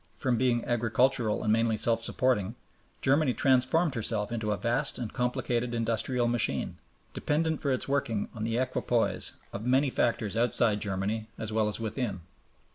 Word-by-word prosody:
From 130 -3 +1
being 120 -1 +1
agricultural 120 0 +1
and 110 - +2
mainly 115 -1 +2
self 115 +1 +1
supporting, 115 -3 0 0.5
Germany 135 -1 +3
transformed 135 +5 +3
herself 110 -2 -2
into 110 -2 -2
a 105 - 0
vast 120 +6 -1
and 120 -4 -5
complicated 125 -1 -1
industrial 115 +2 0
machine, 120 -1 -1 0.3
dependent 160 +1 0
for 140 - 0
its 130 - -1
working 120 -7 -1
on 110 - -5
the 115 +1 -1
equipoise 120 -5 +1 0.2
of 100 - -5
many 130 +3 +2
factors 115 -4 0
outside 115 -2 +2
Germany 105 +2 -2
as 110 -1 -4
well 110 -1 +2
as 105 - +1
within. 110 -4 -3
120 Hz, 155 wpm, -29 LUFS, 110-130 Hz, 0.5 s, Germany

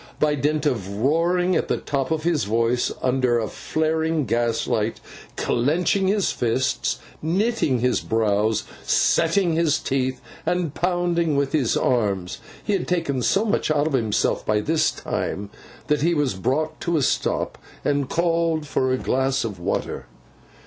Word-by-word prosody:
By 150 -1 +3
dint 150 +2 0
of 110 -10 0
roaring 170 - +2
at - - 0
the - - 0
top 135 -2 -2
of 160 -1 -1
his 160 - +1
voice 115 +3 +1
under 125 -2 +2
a 110 -2 -1
flaring 160 +1 -1
gaslight, 115 -2 0 0.4
clenching 170 +10 +1
his 200 0 +2
fists, 130 +3 0 0.2
knitting 170 - +1
his 125 0 +2
brows, 110 -1 +1 0.2
setting 170 +1 +2
his 160 -2 +2
teeth, 130 -1 -1 0.2
and 175 -4 -1
pounding 175 -3 0
with 140 -1 +1
his 140 -7 +1
arms, 100 -7 0 0.2
he 210 - -1
had 190 - -1
taken 165 -7 0
so 200 - +2
much 205 - 0
out 150 -1 +2
of 155 - -1
himself 115 -5 +1
by 105 0 +1
this 155 +8 +2
time, 100 +1 -4 0.3
that 150 +1 +1
he 170 +2 +2
was 145 -7 +1
brought 135 +11 -1
to 170 -1 0
a 145 - +1
stop, - - 0 0.3
and 140 -2 +1
called 165 -2 +1
for 130 -2 0
a 130 - +2
glass 135 +2 0
of 105 -5 -5
water. 70 -6 -3
145 Hz, 155 wpm, -23 LUFS, 120-165 Hz, 0.4 s, By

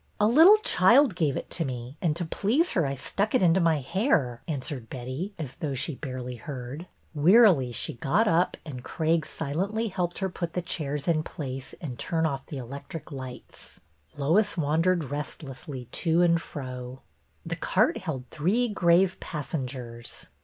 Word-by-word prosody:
" - - -37
A 210 - +4
little 325 - +8
child 245 - +5
gave 155 -6 +1
it - - -6
to 170 - 0
me 125 -1 -5
and 160 -4 +1
to 175 +1 -2
please 235 - +1
her 165 -6 +1
I 135 - -2
stuck 200 - -1
it 250 - +3
into 175 +1 +5
my 165 -4 +2
hair," 135 - +1
answered 135 -5 -4
Betty, 130 - -5
as 145 -6 -5
though 145 -3 -3
she 145 +5 -1
barely 130 -2 -6
heard. 135 +6 -7 0.3
Wearily 165 - +5
she 120 - -2
got 140 - +1
up 170 0 +2
and 130 -5 -7
Craig 160 +1 0
silently 200 +10 -2
helped 180 -2 -2
her 190 - 0
put 175 -2 -5
the 180 - -1
chairs 145 -4 -3
in 160 -2 +3
place 135 -4 -6
and 130 -8 -6
turn 165 -2 0
off 135 -3 -2
the 145 - -6
electric 140 +6 -8
lights. 130 -2 -9 0.4
Lois 185 +9 +2
wan 155 0 +1
dered 170 -6 +1
restlessly 140 -2 -6
to 170 +1 +2
and 170 -1 +3
fro. 130 -3 -7 0.4
The - - -3
cart - - +2
held 150 -9 -4
three 210 +11 +1
grave 185 -1 +3
passengers. 130 -6 -5
155 Hz, 170 wpm, -27 LUFS, 135-180 Hz, 0.4 s, little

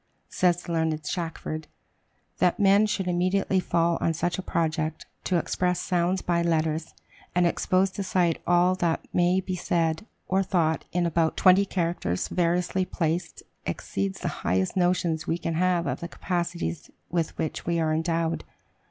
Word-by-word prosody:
Says 175 -1 +2
the - - -6
learned 160 -1 0
Shackford, 160 -2 -4 0.7
"That 180 - +2
men 200 +1 +5
should 195 -3 -2
immediately 185 +2 +1
fall 170 -1 +1
on 165 - +1
such 175 +3 -1
a - - -1
project, 160 -3 -1 0.2
to 180 - +2
express 180 +2 0
sounds 180 +1 0
by 170 -1 +1
letters, 160 -1 0 0.4
and 180 0 +4
expose 185 +2 +2
to 200 - -4
sight 180 -3 +1
all 175 +1 +4
that 170 -3 0
may 180 +1 +3
be 185 0 -3
said 165 +2 0 0.2
or 190 +1 +2
thought 170 -4 +1
in 175 0 +1
about 165 -1 +1
twenty 190 +1 +6
characters 170 - -1
variously 180 +1 +1
placed, 170 -1 -2 0.2
exceeds 95 0 -3
the - - -2
highest 95 +2 0
notions 175 -3 +1
we 165 - +1
can 165 -1 -3
have 175 0 +2
of - - -2
the 170 - -5
capacities 170 -2 -3 0.2
with 165 -2 -1
which 160 -2 -3
we 170 -1 +1
are 160 -1 +1
endowed." 165 +1 0
170 Hz, 160 wpm, -26 LUFS, 165-180 Hz, 0.7 s, twenty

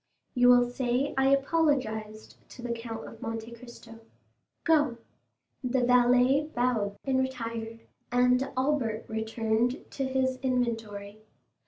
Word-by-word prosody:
"You 245 0 +4
will 245 0 +6
say 250 +2 -1
I 270 0 +3
apologized 270 -7 0
to 245 - -11
the 240 - -3
Count 230 -1 -5
of 225 - -12
Monte 225 0 -5
Cristo. 235 -1 -12 0.6
Go." 295 -7 +3 0.7
The 250 0 +1
valet 250 +3 +4
bowed 235 -5 0
and 265 -1 +1
retired, 230 -3 -4 0.3
and 250 +2 +3
Albert 255 -5 0
returned 220 +2 -1
to 275 - -3
his 260 -1 0
inventory. 225 -5 -2
245 Hz, 120 wpm, -28 LUFS, 225-260 Hz, 0.7 s, will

